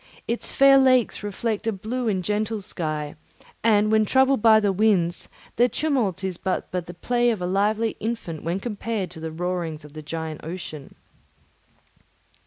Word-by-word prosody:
Its 235 Hz, -, -3 dB
fair 275 Hz, 0 st, +6 dB
lakes 255 Hz, -3 st, +3 dB
reflect 210 Hz, +2 st, -3 dB
a -, -, +3 dB
blue 230 Hz, +5 st, -3 dB
and 190 Hz, -4 st, 0 dB
gentle 215 Hz, +2 st, -1 dB
sky, 155 Hz, -6 st, -4 dB, 0.5 s
and 215 Hz, -1 st, +4 dB
when 220 Hz, 0 st, +4 dB
troubled 265 Hz, +2 st, +3 dB
by 220 Hz, -1 st, +7 dB
the 205 Hz, -2 st, +1 dB
winds, 185 Hz, -4 st, +1 dB, 0.3 s
their 245 Hz, +2 st, +4 dB
tumult 240 Hz, -, 0 dB
is 185 Hz, -2 st, -1 dB
but 190 Hz, -, -2 dB
as 180 Hz, -2 st, -2 dB
the 175 Hz, -, -9 dB
play 240 Hz, +6 st, +1 dB
of 225 Hz, -4 st, 0 dB
a 180 Hz, -, -2 dB
lively 210 Hz, +4 st, +1 dB
infant 215 Hz, -8 st, -4 dB
when 170 Hz, +4 st, -2 dB
compared 210 Hz, -3 st, -3 dB
to 160 Hz, -, -10 dB
the 160 Hz, 0 st, -5 dB
roarings 165 Hz, -2 st, -3 dB
of 145 Hz, -, -14 dB
the 155 Hz, -, -7 dB
giant 160 Hz, 0 st, -5 dB
ocean. 160 Hz, -4 st, -7 dB
205 Hz, 170 wpm, -24 LUFS, 175-230 Hz, 0.5 s, by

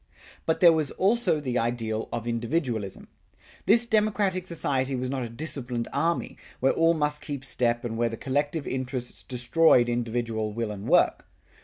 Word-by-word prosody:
But 160 Hz, -, +1 dB
there 170 Hz, -2 st, +8 dB
was 155 Hz, -3 st, 0 dB
also 200 Hz, -4 st, +1 dB
the 130 Hz, -4 st, -1 dB
ideal 115 Hz, -2 st, -2 dB
of 115 Hz, -, -3 dB
individualism. 115 Hz, -, -2 dB, 0.6 s
This 230 Hz, +3 st, +5 dB
democratic 210 Hz, -5 st, +1 dB
society 135 Hz, -5 st, -1 dB
was 130 Hz, 0 st, -2 dB
not 135 Hz, -1 st, -2 dB
a 120 Hz, -, -4 dB
disciplined 120 Hz, -2 st, -3 dB
army, 165 Hz, +5 st, -1 dB, 0.2 s
where 135 Hz, -, +3 dB
all 165 Hz, +1 st, +3 dB
must 150 Hz, -1 st, -1 dB
keep 140 Hz, -3 st, -6 dB
step 120 Hz, -2 st, 0 dB
and 115 Hz, -1 st, -3 dB
where 120 Hz, 0 st, +2 dB
the 115 Hz, -, -6 dB
collective 145 Hz, +3 st, -1 dB
interests 130 Hz, -1 st, -4 dB
destroyed 125 Hz, +1 st, +3 dB
individual 115 Hz, -2 st, -2 dB
will 115 Hz, -1 st, -2 dB
and 100 Hz, -1 st, -7 dB
work. -, -, +3 dB
130 Hz, 160 wpm, -26 LUFS, 120-160 Hz, 0.6 s, there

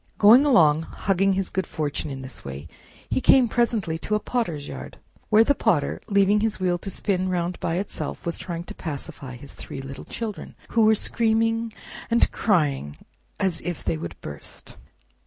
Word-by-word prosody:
Going 230 Hz, +7 st, +8 dB
along, 160 Hz, -, +5 dB
hugging 195 Hz, +3 st, +1 dB
his 190 Hz, -1 st, -2 dB
good 190 Hz, 0 st, -1 dB
fortune 150 Hz, -1 st, -3 dB
in 135 Hz, -1 st, -6 dB
this 130 Hz, -1 st, -8 dB
way, 70 Hz, +3 st, -7 dB, 0.4 s
he -, -, 0 dB
came 260 Hz, -2 st, +6 dB
presently 220 Hz, -9 st, 0 dB
to 210 Hz, -, -1 dB
a -, -, +2 dB
Potter's 175 Hz, -13 st, -2 dB
yard, -, -, -8 dB, 0.3 s
where 220 Hz, 0 st, +7 dB
the 285 Hz, -, +3 dB
Potter, 185 Hz, -, +1 dB
leaving 200 Hz, +1 st, +4 dB
his 215 Hz, -1 st, -1 dB
wheel 180 Hz, -1 st, +1 dB
to 195 Hz, -, -6 dB
spin 185 Hz, -1 st, -1 dB
round 180 Hz, 0 st, -1 dB
by 165 Hz, -, -1 dB
itself, 195 Hz, +1 st, -4 dB
was 170 Hz, -, -2 dB
trying 170 Hz, -2 st, -5 dB
to -, -, -7 dB
pacify 140 Hz, -4 st, -7 dB
his 140 Hz, +3 st, -10 dB
three -, -, -8 dB
little 135 Hz, 0 st, -8 dB
children, 220 Hz, -4 st, -6 dB
who 230 Hz, -, +2 dB
were 220 Hz, 0 st, +6 dB
screaming 225 Hz, +1 st, +1 dB, 0.4 s
arid 235 Hz, 0 st, +3 dB
crying 145 Hz, -, +1 dB, 0.4 s
as 185 Hz, -4 st, 0 dB
if 175 Hz, -3 st, -4 dB
they 85 Hz, -4 st, 0 dB
would 85 Hz, +1 st, -7 dB
burst. 70 Hz, -1 st, -8 dB
185 Hz, 175 wpm, -24 LUFS, 150-220 Hz, 0.4 s, Going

